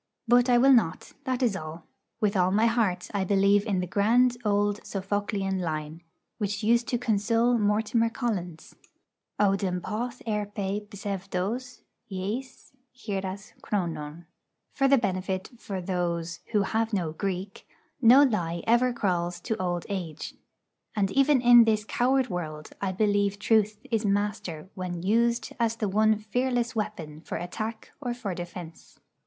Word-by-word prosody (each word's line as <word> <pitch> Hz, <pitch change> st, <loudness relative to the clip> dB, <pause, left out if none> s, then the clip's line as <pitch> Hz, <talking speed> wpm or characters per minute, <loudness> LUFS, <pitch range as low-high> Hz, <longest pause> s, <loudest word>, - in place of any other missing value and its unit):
But 245 Hz, +1 st, +5 dB
I 245 Hz, -, +6 dB
will 270 Hz, +3 st, +6 dB
not, 180 Hz, -9 st, +1 dB
that 260 Hz, -1 st, -1 dB
is 225 Hz, -5 st, +2 dB
all. 160 Hz, -1 st, -7 dB, 0.4 s
With 210 Hz, -2 st, +1 dB
all 180 Hz, -1 st, +3 dB
my 210 Hz, +4 st, +3 dB
heart 220 Hz, -6 st, 0 dB
I 200 Hz, -2 st, 0 dB
believe 200 Hz, +2 st, +3 dB
in 190 Hz, -3 st, +1 dB
the -, -, -2 dB
grand 235 Hz, +7 st, +3 dB
old 205 Hz, -1 st, +1 dB
Sophoclean 195 Hz, 0 st, -2 dB
line, 155 Hz, -1 st, -4 dB, 0.4 s
which 205 Hz, 0 st, -2 dB
used 235 Hz, +2 st, +3 dB
to 245 Hz, -, 0 dB
console 230 Hz, +1 st, +2 dB
Mortimer 220 Hz, +2 st, +2 dB
Collins: 185 Hz, -10 st, -4 dB, 0.7 s
Οὐδεν 195 Hz, -3 st, +1 dB
ποθ' 235 Hz, +6 st, -4 dB
ἑρπει 205 Hz, -1 st, -2 dB
ψευδος 200 Hz, +4 st, -4 dB, 0.3 s
εἰς 210 Hz, +8 st, -5 dB, 0.3 s
γηρας 195 Hz, -3 st, -5 dB
χρονον. 170 Hz, -4 st, -3 dB, 0.5 s
For 275 Hz, -, +2 dB
the 275 Hz, 0 st, +6 dB
benefit 190 Hz, -3 st, -2 dB
for 195 Hz, -4 st, -5 dB
those 170 Hz, -2 st, -2 dB
who 210 Hz, -3 st, +3 dB
have 225 Hz, +3 st, -1 dB
no 175 Hz, -6 st, 0 dB
Greek: 190 Hz, +3 st, -4 dB, 0.3 s
'No 255 Hz, +4 st, +8 dB
lie 175 Hz, -10 st, 0 dB
ever 240 Hz, +2 st, +4 dB
crawls 180 Hz, -6 st, -1 dB
to 220 Hz, -5 st, -3 dB
old 175 Hz, -1 st, -2 dB
age.' 175 Hz, -6 st, -5 dB, 0.6 s
And 195 Hz, -2 st, +1 dB
even 275 Hz, 0 st, +4 dB
in 240 Hz, -1 st, +8 dB
this 215 Hz, -1 st, +1 dB
coward 255 Hz, +3 st, +2 dB
world 155 Hz, -4 st, -5 dB
I 195 Hz, -1 st, 0 dB
believe 205 Hz, 0 st, +1 dB
truth 215 Hz, 0 st, +2 dB
is 225 Hz, -1 st, +1 dB
master 200 Hz, -5 st, -1 dB
when 180 Hz, -2 st, -5 dB
used 235 Hz, +4 st, +1 dB
as 230 Hz, -1 st, +1 dB
the 220 Hz, -2 st, -2 dB
one 215 Hz, +2 st, +3 dB
fearless 240 Hz, +2 st, -1 dB
weapon, 170 Hz, -8 st, -4 dB
for -, -, -5 dB
attack 215 Hz, +5 st, -5 dB
or 245 Hz, -3 st, -2 dB
for 215 Hz, -6 st, -4 dB
defence. 175 Hz, -1 st, -9 dB
205 Hz, 145 wpm, -27 LUFS, 185-230 Hz, 0.7 s, No